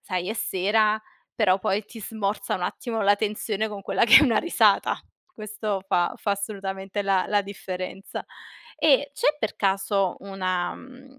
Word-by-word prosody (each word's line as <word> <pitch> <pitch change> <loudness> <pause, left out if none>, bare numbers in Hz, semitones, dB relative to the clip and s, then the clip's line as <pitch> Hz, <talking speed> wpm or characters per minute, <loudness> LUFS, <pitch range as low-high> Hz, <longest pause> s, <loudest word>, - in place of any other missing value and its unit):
sai 185 0 -3
è - - 0
sera, 210 +1 +1 0.4
però 185 +1 +3
poi 195 +2 -1
ti 225 +1 -11
smorza 205 -1 -2
un 180 - -4
attimo 225 +4 -3
la 200 +1 +5
tensione 215 0 -2
con 200 -2 -7
quella - - +2
che 225 - +10
è - - +4
una 240 -7 +3
risata. 340 - +3 0.3
Questo 215 - -4
fa 175 -2 +1
fa 205 - -2
assolutamente 195 -1 -3
la 195 -2 +1
la 205 -1 +2
differenza. 195 -1 -6 0.5
E 285 -2 +3
c'è 295 +1 +1
per 220 - -2
caso 195 -1 0
una 185 -2 -2
mhmm, 265 +1 -15
205 Hz, 160 wpm, -25 LUFS, 195-220 Hz, 0.5 s, che